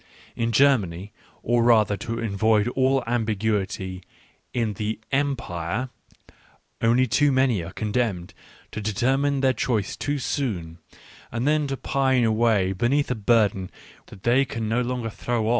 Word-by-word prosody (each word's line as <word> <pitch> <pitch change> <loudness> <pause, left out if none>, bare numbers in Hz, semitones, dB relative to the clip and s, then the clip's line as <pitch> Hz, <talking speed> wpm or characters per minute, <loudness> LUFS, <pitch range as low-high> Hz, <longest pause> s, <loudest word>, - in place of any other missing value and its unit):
In 115 0 -1
Ger 135 +3 +5
many, 95 +1 -7 0.3
or 120 +1 +2
rather, 110 -3 +4
to 115 +3 -5
avoid 110 0 +1
all 130 +1 +1
ambiguity, 105 -5 -1 0.5
in 115 -3 -1
the 110 +2 -3
Empire,* 125 - -2 0.9
only 120 +3 +4
too 145 +4 +2
many 130 -8 +2
are 85 - -8
condemned 105 -4 -2 0.4
to 105 - -5
deter 120 +5 +1
mine 140 0 0
their 130 -1 +3
choice 110 -6 -1
too 145 0 -2
soon, 95 - -3 0.5
and 120 +4 -2
then 150 -1 +2
to 135 -1 -3
pine 130 -2 +1
away 110 -4 +2
beneath 125 +8 +1
a - - 0
burden 105 -4 +2 0.4
that 95 - -14
they 125 +3 +4
can 115 -4 -4
no 115 +3 +1
longer 120 -2 -3
throw 115 0 -2
115 Hz, 145 wpm, -24 LUFS, 105-130 Hz, 0.9 s, Ger